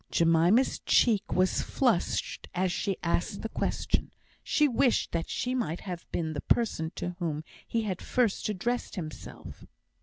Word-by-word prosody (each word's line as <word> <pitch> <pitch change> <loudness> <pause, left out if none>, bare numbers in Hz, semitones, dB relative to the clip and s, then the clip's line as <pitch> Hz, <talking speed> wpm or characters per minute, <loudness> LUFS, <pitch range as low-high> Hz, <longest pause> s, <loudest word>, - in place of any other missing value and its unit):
Jemima's 170 +9 +4
cheek 215 -4 +3
was 185 +1 +2
flushed 240 -10 0
as 185 0 +1
she 195 +1 -1
asked 175 +3 -1
the 225 - -2
question; - - -1 0.3
she 300 - +3
wished 250 -1 +2
that 165 -1 -2
she 250 - -1
might 175 -10 -2
have 180 -3 -7
been 160 -2 -1
the 145 - -3
person 165 -9 +1
to 180 - -3
whom 155 -3 -2 0.2
he 230 -1 0
had 190 -4 -3
first 235 -4 +1
addressed 235 +5 -2
himself. 160 -6 -8
185 Hz, 150 wpm, -29 LUFS, 170-230 Hz, 0.3 s, Jemima's